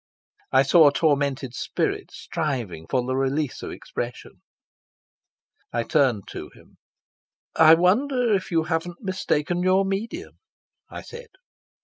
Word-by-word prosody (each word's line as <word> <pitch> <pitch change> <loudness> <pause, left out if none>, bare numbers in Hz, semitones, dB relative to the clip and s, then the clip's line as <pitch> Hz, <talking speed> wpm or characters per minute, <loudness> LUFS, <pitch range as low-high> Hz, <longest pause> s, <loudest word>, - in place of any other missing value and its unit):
I 130 +1 +5
saw 155 +3 +6
a - - +5
tormented 140 -4 0
spirit - - -2
striving 120 - -4
for 125 -2 0
the 130 +1 -1
release 135 +1 -1
of - - -6
expression. 120 0 -7 1.3
I 120 0 -1
turned 125 -7 +1
to - - -7
him. - - -21 0.8
"I 160 0 +8
wonder 240 +7 +2
if 190 -2 -1
you 165 -2 +1
haven't 170 +4 -3
mistaken 180 -3 -1
your 185 +2 +3
medium," 225 - -4 0.5
I - - -8
said. 475 0 -11
160 Hz, 125 wpm, -24 LUFS, 135-190 Hz, 1.3 s, I